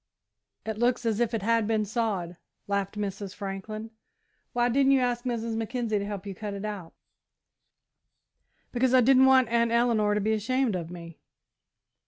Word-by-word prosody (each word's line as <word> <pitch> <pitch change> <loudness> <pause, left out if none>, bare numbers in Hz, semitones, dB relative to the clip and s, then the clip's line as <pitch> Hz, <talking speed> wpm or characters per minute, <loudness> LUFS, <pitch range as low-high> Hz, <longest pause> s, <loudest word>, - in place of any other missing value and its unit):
"It 220 -1 -4
looks 245 0 +1
as 225 -1 0
if 235 -2 +1
it 215 - -3
had 230 0 +2
been 220 -1 +1
sawed," 200 -6 -2 0.3
laughed 200 0 -2
Mrs. 200 -1 -4
Franklin. 210 +2 -6 0.6
"Why 240 0 +1
didn't 270 +2 +3
you 270 - +4
ask 245 0 -1
Mrs. 230 -2 -2
Mackenzie 225 -1 -1
to 200 - -3
help 205 -1 -6
you 200 - -5
cut 205 +1 -6
it?" 200 +1 -5 2.1
"Because 255 +1 +2
I 255 - +7
didn't 265 +2 +6
want 260 -3 +5
Aunt 235 0 +2
Eleanor 230 -3 +2
to - - +1
be 215 +2 +1
ashamed 230 +1 0
of 170 -2 -4
me." 170 -2 -10
220 Hz, 165 wpm, -27 LUFS, 200-240 Hz, 2.1 s, I